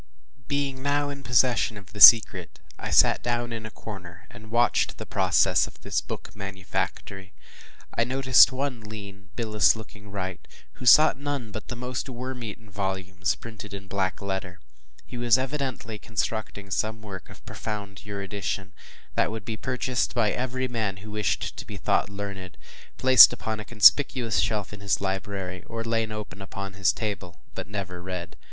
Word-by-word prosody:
Being 140 -2 -2
now 145 +1 0
in 140 -1 -7
possession 125 -3 +2
of 100 0 -13
the 105 - -7
secret, 115 -1 +8 0.2
I - - -5
sat - - +5
down 120 0 -2
in 110 -1 -5
a - - -9
corner, 90 -6 -10
and 110 +1 -13
watched 120 +1 +1
the - - -7
process - - +2
of - - -14
this - - -1
book - - -8
manufactory. 95 0 -5 0.6
I 115 - +2
noticed 130 +1 +5
one 130 -1 -3
lean, 100 -2 -10
bilious 105 -9 +3
looking 105 -2 -12
wight, 95 -2 -5 0.3
who 125 - -7
sought 155 +1 +7
none 140 -6 -4
but 110 - -7
the 120 - -5
most 125 +2 -4
worm 125 0 -6
eaten 110 0 -8
volumes, 95 -1 -2
printed 110 -3 -9
in 100 0 -9
black 95 0 -2
letter. 95 -2 -4 0.5
He 125 - -8
was 120 -1 +4
evidently 130 -5 -4
constructing 105 -2 -4
some 110 +2 -2
work 95 -3 -9
of - - -15
profound 100 -2 -6
erudition, 100 -1 -4 0.4
that - - +1
would 110 -1 -6
be 110 - -4
purchased 125 +1 -2
by 115 -3 +2
every 130 +1 -2
man 110 -5 -2
who 105 - -9
wished 105 -1 -2
to - - -5
be - - -7
thought - - +1
learned, 100 -2 -7 0.4
placed 130 -1 +9
upon 110 -1 -4
a 105 - -7
conspicuous 120 +1 +5
shelf 105 -2 -1
of 105 - -10
his 100 -1 +1
library, 95 -1 -4
or 115 0 -5
laid 115 -1 -1
open 105 -2 -7
upon 95 0 -7
his 95 0 +2
table 100 -5 -5
but - - -6
never 95 -3 -5
read. 90 -1 -6
105 Hz, 170 wpm, -26 LUFS, 100-120 Hz, 0.6 s, placed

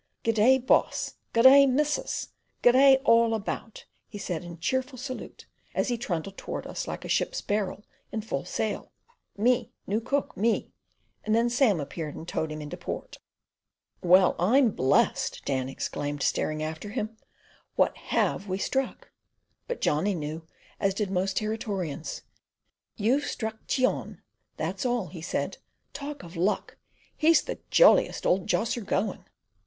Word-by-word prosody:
"Good 225 - +2
day, 230 +5 +5
boss! 260 0 +1 0.2
Good 230 - +3
day, 275 +1 +9
missus! 295 +3 0 0.3
Good 245 - +8
day, 265 +1 +7
all 230 -1 +5
about," 220 +1 -5 0.2
he 210 - -8
said 180 -4 -4
in 175 -1 -9
cheerful 260 - -1
salute, 255 +1 -7 0.3
as - - +1
he 240 - 0
trundled 195 -2 -3
towards - - -5
us - - -5
like - - -5
a - - -4
ship's - - 0
barrel 205 0 -2 0.3
in 220 - -2
full 220 - -3
sail. - - -3 0.5
"Me 240 +2 +2
new 210 +3 0
cook, 275 +4 -1
me—" 225 +3 0 0.5
and 215 +1 +1
then 235 +1 +2
Sam 240 - +3
appeared 150 +1 -5
and 165 - -8
towed 160 -2 -2
him 155 0 -5
into 145 - -7
port. - - -6 0.8
"Well, 185 +1 +5
I'm 235 +7 +4
blest!" 130 -7 +1
Dan 130 -2 -1
exclaimed, 145 +1 -3
staring 155 0 0
after 160 +6 -5
him. 220 0 -4 0.6
"What - - +3
HAVE 200 - -1
we 185 0 -1
struck?" 265 +6 -2 0.6
But - - -4
Johnny 190 +7 +1
knew, 160 +1 -5 0.3
as 195 -1 +1
did 200 -2 -2
most 190 +1 0
Territorians. 205 -8 -3 0.7
"You've 255 +7 +1
struck 220 -4 -5
Cheon, 255 -1 0 0.3
that's - - -3
all," 245 -6 0
he 170 -3 -9
said. 165 - -3 0.3
"Talk 290 0 -6
of 170 -1 -11
luck! 185 +5 -1 0.4
He's 320 0 +4
the - - -5
jolliest - - +5
old 185 +2 +2
josser 230 +2 0
going." 200 0 -2
215 Hz, 150 wpm, -27 LUFS, 175-250 Hz, 0.8 s, day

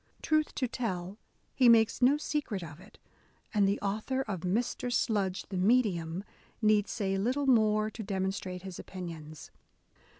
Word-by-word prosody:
Truth 310 -1 +1
to 255 - 0
tell, 200 -5 -4 0.3
he 255 -3 +5
makes 225 +1 +4
no 265 +4 +5
secret 290 - -3
of 160 -1 -9
it, 195 +3 -16 0.6
and 205 -2 +4
the 200 +1 +1
author 215 +7 -1
of 195 -8 -4
Mr, 230 +7 -1
Sludge 200 -6 0
the 190 - -3
Medium 185 -5 +2 0.4
need 215 -2 +3
say 195 -3 -1
little 255 +7 0
more 215 -4 +3
to 220 - -7
demonstrate 190 -2 -3
his 190 -2 -7
opinions. 165 -4 -8
205 Hz, 145 wpm, -30 LUFS, 185-240 Hz, 0.6 s, he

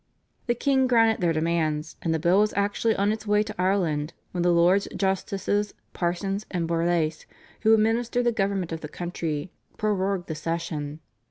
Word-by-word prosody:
The 240 - +2
king 265 +1 +2
granted 225 -4 +3
their 170 -2 +3
demands, 155 -1 -1
and 165 - -1
the 160 - +2
bill 175 +5 +3
was 210 +1 +2
actually 205 +2 +1
on 200 +1 +2
its 220 0 -5
way 210 0 +3
to 215 0 -7
Ireland 170 -6 0 0.2
when 180 - -2
the 175 0 +3
Lords 175 +3 +4
Justices, 195 +1 -1 0.2
Parsons 195 +4 -1
and 175 -3 -2
Borlase, 165 -2 0 0.3
who 220 0 +6
administered 230 +3 +1
the 240 - +4
government 195 -5 -1
of 165 0 -4
the 150 - -5
country 170 -2 -4 0.3
prorogued 195 -3 0
the 160 - -3
session. 155 -1 -4
185 Hz, 170 wpm, -26 LUFS, 165-210 Hz, 0.3 s, who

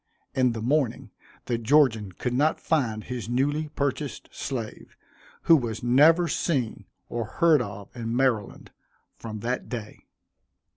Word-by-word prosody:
In 125 -2 +2
the 110 -1 -5
morning 135 -1 0 0.3
the 120 -1 -1
Georgian 115 -5 +3
could 125 +6 -3
not 150 +5 +2
find 115 -9 0
his 120 -2 -5
newly 145 +5 0
purchased 140 0 -3
slave, 120 -5 -6 0.5
who 165 - +7
was 115 -6 -2
never 155 +8 +5
seen 125 - -1 0.2
or 115 -1 -3
heard 160 +4 +3
of 100 -2 -8
in 115 -1 -3
Maryland 125 -6 0 0.5
from 110 -2 -7
that 125 +3 -3
day. 115 -4 -7
125 Hz, 135 wpm, -26 LUFS, 115-145 Hz, 0.5 s, who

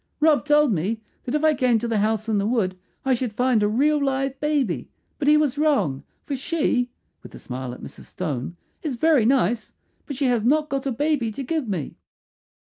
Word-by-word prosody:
"Rob 300 -2 +4
told 295 -4 +4
me 195 +7 -1 0.3
that 250 - -2
if 300 - 0
I 310 -1 +5
came 255 -5 +2
to 235 - -2
the 225 -2 0
house 215 +1 0
in 215 -2 +1
the 200 - 0
wood 215 -6 0 0.3
I 265 - +3
should 245 -3 -2
find 245 -1 +2
a 205 - +3
real 285 +7 +2
live 270 0 -1
baby; 275 - 0 0.3
but 285 - -1
he 300 0 +7
was 290 -2 +1
wrong, 275 - +1 0.2
for 285 - -2
she," 265 -3 0 0.3
with - - -12
a - - -8
smile 130 0 -6
at 125 - -10
Mrs. - - -10
Stone, 165 -3 -4 0.2
"is 295 -6 -3
very 275 -3 +3
nice, 235 -4 +1 0.3
but 280 - -4
she 275 +2 -1
has 240 -4 +2
not 300 +5 +2
got 275 0 -2
a - - 0
baby 260 -2 0
to 275 - -5
give 300 0 -2
me." 170 -8 -4
255 Hz, 215 wpm, -23 LUFS, 215-290 Hz, 0.3 s, he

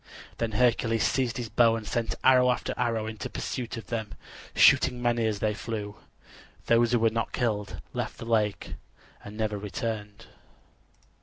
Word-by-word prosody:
Then 115 -2 -1
Hercules 115 -1 +2
seized 125 -4 0
his 120 -2 -3
bow 115 -1 +4
and 110 -2 -6
sent 115 -1 -2
arrow 125 -1 +6
after 125 - -1
arrow 115 -2 -1
in 110 -1 -7
pursuit 120 +4 -4
of 115 - -7
them, 110 -1 -4 0.4
shooting 125 - +5
many 120 -2 +1
as 105 -2 -1
they 105 +1 0
flew. 105 -1 -5 0.7
Those 115 0 +3
who 120 - +4
were 115 -1 +3
not 115 +1 -2
killed 105 -4 -2
left - - -4
the - - -8
lake 110 -3 0 0.5
and 105 +1 -9
never 105 -2 -1
returned. 105 +1 -5
115 Hz, 160 wpm, -27 LUFS, 105-120 Hz, 0.7 s, arrow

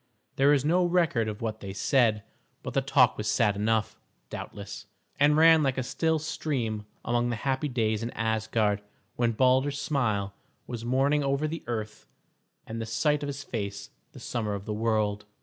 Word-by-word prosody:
There 140 +2 +4
is 145 -1 +3
no 175 +4 +3
record 170 -10 +2
of 105 +1 -5
what 110 -1 -3
they 95 -1 -7
said, 110 -1 +2 0.4
but - - -5
the - - +2
talk - - +4
was 105 0 -1
sad 105 -1 +2
enough, 110 +1 0 0.4
doubtless, - - -7 0.3
and 145 +1 +5
ran 160 0 +7
like 135 -3 0
a 130 - 0
still 160 +5 0
stream 120 -9 -3 0.2
among 120 0 +1
the 120 - -1
happy 135 +5 -1
days 110 -5 0
in 115 - -3
Asgard 110 -2 0 0.3
when 120 -1 +1
Balder's 130 +4 +2
smile 110 -10 0 0.3
was 120 -2 -6
morning 135 +4 +2
over 140 +2 0
the 160 +1 -5
earth 110 -2 -5 0.6
and 115 +1 -5
the 115 - -4
sight 150 +6 +1
of 145 - -3
his 140 0 -5
face 100 -5 -5 0.2
the - - -11
summer 110 -4 -3
of 100 0 -7
the 105 - -3
world. 105 -1 0
120 Hz, 180 wpm, -28 LUFS, 110-140 Hz, 0.6 s, ran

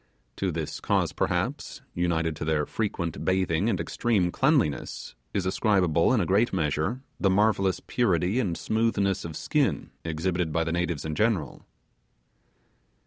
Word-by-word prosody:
To - - 0
this - - -4
cause - - +1
perhaps, - - -2
united 80 -2 0
to - - -4
their 75 -1 +1
frequent 90 -6 -3
bathing 95 +1 +1
and 95 -6 0
extreme 90 +2 0
cleanliness, 135 - 0 0.2
is 95 -2 -1
ascribable, 95 -3 +2
in 130 - +3
a - - +1
great 105 +6 +2
measure, 80 - -1 0.2
the 95 - +3
marvellous 100 -1 +2
purity 95 -2 +1
and 90 -9 -1
smoothness 100 -2 0
of 80 -2 -6
skin - - 0
exhibited 85 +1 -1
by 85 +2 +1
the 80 - -2
natives 85 -3 -1
in 80 - -2
general. 100 - -1
90 Hz, 140 wpm, -27 LUFS, 80-105 Hz, 0.2 s, in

